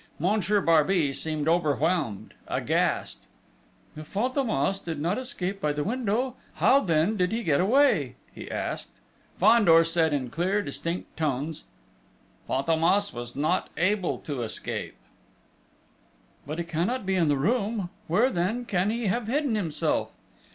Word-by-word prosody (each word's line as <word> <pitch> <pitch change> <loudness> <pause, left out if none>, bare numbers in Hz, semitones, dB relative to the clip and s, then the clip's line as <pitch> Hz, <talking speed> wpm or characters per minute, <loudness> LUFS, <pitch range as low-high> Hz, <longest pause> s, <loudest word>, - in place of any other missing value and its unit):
Monsieur 205 +3 +1
Barbey 165 -2 +3
seemed 155 +1 -3
overwhelmed 155 - 0
aghast. - - -1 0.7
"If 155 0 -10
Fantômas 215 - 0
did 165 -3 -4
not 175 +9 0
escape 200 -7 -4
by 150 -3 +1
the 145 0 -2
window, 245 - -1 0.2
how 275 - +5
then 170 - +1
did 180 0 +1
he 230 +1 -2
get 150 -4 +2
away?" 200 - +3 0.2
he - - -9
asked. - - -4 0.5
Fandor 200 -5 +6
said 165 -1 +1
in 130 -4 -2
clear, 190 +5 0
distinct 170 -2 -4
tones: 150 0 -2 0.8
"Fantômas 165 +8 +2
was 120 0 -7
not 150 +2 0
able 185 +1 +1
to 140 -5 -5
escape!..." 110 -2 -4 1.5
"But 155 +2 -4
he 170 - -1
cannot 175 +8 -2
be 190 - 0
in 175 -4 +2
the 145 -1 +2
room?... 205 - 0 0.2
Where, 225 +11 +3
then, 210 +8 -1
can 195 -2 0
he 230 +1 -2
have 215 +3 0
hidden 280 +1 0
himself?" 180 -8 -1
180 Hz, 135 wpm, -26 LUFS, 155-215 Hz, 1.5 s, Fandor